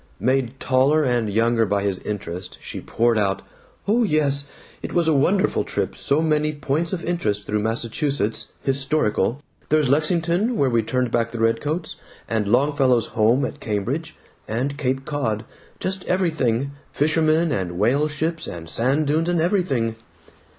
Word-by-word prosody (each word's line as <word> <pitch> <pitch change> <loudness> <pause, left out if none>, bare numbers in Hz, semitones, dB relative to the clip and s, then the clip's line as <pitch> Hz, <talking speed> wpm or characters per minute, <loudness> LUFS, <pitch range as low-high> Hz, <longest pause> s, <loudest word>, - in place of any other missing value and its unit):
Made 130 +1 0
taller 135 +4 +3
and 120 -5 +1
younger 115 +2 +2
by 100 -2 0
his 100 -2 0
interest 90 -3 -5
she - - -7
poured 115 -1 +1
out, 95 -2 0 0.4
"Oh 220 +4 +3
my 235 - +3
yes. 140 -3 +1 0.4
It - - -6
was 170 -2 +2
a 160 - +4
wonderful 180 +8 +2
trip. - - -3
So 150 +3 +1
many 155 -1 +1
points 145 +4 -1
of 185 - -3
interest 105 -13 -1
through 105 0 -1
Massachusetts 115 +2 -1 0.2
historical. 135 -2 0 0.3
There's 155 -2 +3
Lexington 170 - +2
where 135 -2 +2
we 115 -1 +3
turned 125 +1 -1
back 115 -1 +1
the 115 - -6
redcoats, 115 +9 0 0.3
and 110 -2 -1
Longfellow's 130 0 +2
home 115 +4 +3
at - - -6
Cambridge, 130 +10 -3 0.3
and 130 +6 -2
Cape 135 -1 -2
Cod 120 -8 -2 0.3
just 190 0 -2
everything 140 -8 0 0.2
fishermen 155 +2 +2
and 90 -7 -2
whale 140 +9 +2
ships 160 +2 -2
and 85 -1 -7
sand 135 +6 +1
dunes 160 +4 +1
and 175 -1 +1
everything." 160 - 0
135 Hz, 155 wpm, -22 LUFS, 115-155 Hz, 0.4 s, a